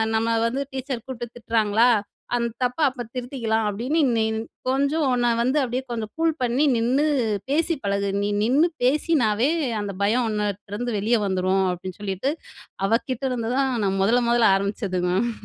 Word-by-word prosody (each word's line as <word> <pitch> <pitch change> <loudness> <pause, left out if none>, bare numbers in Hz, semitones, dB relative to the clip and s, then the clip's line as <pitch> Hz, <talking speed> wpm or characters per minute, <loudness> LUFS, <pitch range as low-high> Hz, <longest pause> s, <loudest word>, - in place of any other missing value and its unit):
நம்ம 220 0 +1 0.2
வந்து 255 +4 -1
டீச்சர் 260 -3 -4
கூப்டு 245 -2 -5
திட்டுறாங்களா, 225 -1 +2 0.5
அந்த 235 -1 0
தப்ப 250 +5 -1
அப்ப 255 -1 -8
திருத்திக்கலாம் 240 -3 -1
அப்டின்னு 250 +11 0 0.2
நீ 220 - +2 0.4
கொஞ்சம் 280 +3 +1
உன்ன 240 -1 +2
வந்து 260 +5 +1
அப்டியே 250 +1 -2
கொஞ்சம் 220 -2 -4
கூல் 325 0 +2
பண்ணி 250 +5 +2
நின்னு 250 +6 +2 0.5
பேசி 330 +3 +2
பழகு. 200 0 0
நீ 205 - 0
நின்னு 280 +9 +4 0.2
பேசினாவே 255 -3 +2 0.3
அந்த 200 -1 -4
பயம் 235 +4 +2
உன்னட்ட 205 -2 -3
இருந்து 240 0 -2
வெளியே 225 +3 +2
வந்துரும்." 190 0 +1
அப்டின்னு 185 +2 -8
சொல்லிட்டு 200 +7 -1 0.6
அவ 215 - -2 0.2
கிட்ட 255 +1 -3
இருந்து 230 -2 -2
தான் 270 -1 +1
நான் 195 0 0
முதல, 240 +4 +3
முதல 240 -1 +3
ஆரம்பிச்சது 200 -1 -2
மேம். 205 +7 +1
235 Hz, 160 wpm, -23 LUFS, 205-260 Hz, 0.6 s, நின்னு